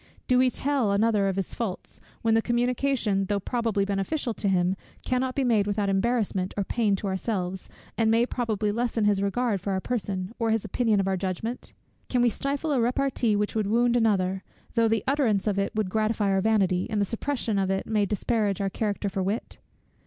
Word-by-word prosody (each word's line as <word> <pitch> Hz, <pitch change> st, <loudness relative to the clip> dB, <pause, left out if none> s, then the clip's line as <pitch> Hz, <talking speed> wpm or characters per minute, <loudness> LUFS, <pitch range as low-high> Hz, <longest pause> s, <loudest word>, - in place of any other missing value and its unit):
Do 250 Hz, 0 st, +4 dB
we 255 Hz, 0 st, +5 dB
tell 265 Hz, -5 st, 0 dB
another 205 Hz, 0 st, +2 dB
of 190 Hz, -, 0 dB
his 195 Hz, -2 st, -3 dB
faults, 215 Hz, -6 st, -5 dB, 0.2 s
when 225 Hz, -1 st, +3 dB
the 225 Hz, -, +4 dB
communication, 240 Hz, -4 st, +1 dB
though 200 Hz, +1 st, 0 dB
probably 225 Hz, -2 st, 0 dB
beneficial 205 Hz, +6 st, -1 dB
to 210 Hz, -, -3 dB
him, 185 Hz, -1 st, +2 dB, 0.3 s
cannot 255 Hz, 0 st, 0 dB
be 275 Hz, -, +1 dB
made 220 Hz, -5 st, +2 dB
without 205 Hz, -1 st, 0 dB
embarrassment 195 Hz, -2 st, 0 dB
or 200 Hz, -, +1 dB
pain 210 Hz, 0 st, +1 dB
to 195 Hz, -, -6 dB
ourselves, 190 Hz, -1 st, -3 dB, 0.3 s
and 225 Hz, -1 st, +3 dB
may 230 Hz, +2 st, +4 dB
probably 220 Hz, -5 st, -1 dB
lessen 230 Hz, -1 st, 0 dB
his 205 Hz, -1 st, +3 dB
regard 200 Hz, 0 st, 0 dB
for 200 Hz, -, -2 dB
our 190 Hz, -, 0 dB
person, 195 Hz, -3 st, -3 dB
or 230 Hz, -1 st, +1 dB
his 225 Hz, -1 st, +1 dB
opinion 225 Hz, -5 st, +1 dB
of 195 Hz, -, 0 dB
our 190 Hz, -1 st, +1 dB
judgment? 195 Hz, +6 st, -4 dB, 0.4 s
Can 245 Hz, -1 st, +2 dB
we 240 Hz, -, +5 dB
stifle 280 Hz, +6 st, -2 dB
a 265 Hz, -4 st, +2 dB
repartee 245 Hz, -2 st, +1 dB
which 210 Hz, 0 st, 0 dB
would 215 Hz, -2 st, 0 dB
wound 240 Hz, +3 st, +3 dB
another; 195 Hz, -5 st, +2 dB, 0.3 s
though 230 Hz, -1 st, +3 dB
the 225 Hz, -2 st, +1 dB
utterance 260 Hz, -8 st, +1 dB
of 200 Hz, -2 st, +1 dB
it 195 Hz, -, 0 dB
would 210 Hz, -4 st, -1 dB
gratify 215 Hz, -1 st, +1 dB
our 195 Hz, 0 st, +2 dB
vanity, 195 Hz, -4 st, +2 dB
and 215 Hz, -, -1 dB
the 200 Hz, -, +2 dB
suppression 230 Hz, -1 st, -2 dB
of 190 Hz, -1 st, 0 dB
it 195 Hz, 0 st, -1 dB
may 210 Hz, -2 st, +1 dB
disparage 210 Hz, 0 st, 0 dB
our 195 Hz, -1 st, -1 dB
character 205 Hz, -1 st, -2 dB
for 195 Hz, 0 st, -2 dB
wit? 200 Hz, +5 st, -3 dB
215 Hz, 205 wpm, -26 LUFS, 195-235 Hz, 0.4 s, we